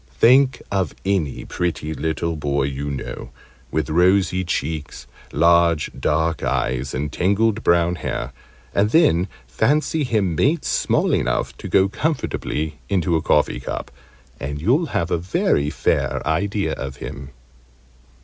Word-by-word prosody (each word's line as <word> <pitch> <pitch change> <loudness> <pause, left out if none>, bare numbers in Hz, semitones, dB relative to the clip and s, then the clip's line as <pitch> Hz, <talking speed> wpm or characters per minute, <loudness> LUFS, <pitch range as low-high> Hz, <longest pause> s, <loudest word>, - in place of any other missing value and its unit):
Think 130 - +5
of 95 -6 -1
any 95 -8 -1
pretty 80 -3 -2
little 80 +1 -2
boy 70 -2 0
you 70 +1 -3
know, 70 -2 -6 0.4
with 75 0 -1
rosy 90 +2 +3
cheeks, 80 -4 -3 0.3
large 85 0 +3
dark 80 +1 0
eyes, 65 +1 -1
and 70 +2 -2
tangled 105 +5 +1
brown 85 0 +3
hair, - - -4 0.4
and 100 +1 +2
then 105 - +4 0.2
fancy 150 - +1
him 105 -8 0
made 145 - +1
small - - +1
enough - - 0
to - - -7
go 95 0 +4
comfortably 85 - -2
into 90 -3 +1
a 80 - +1
coffee 75 -5 +2
cup, 65 - -5 0.5
and 70 +1 -4
you'll 130 - +2
have 85 - -2
a 85 - +1
very 80 -4 +1
fair 70 -1 -1
idea 100 +5 0
of 70 -1 -5
him. 70 0 -8
85 Hz, 135 wpm, -21 LUFS, 75-100 Hz, 0.5 s, Think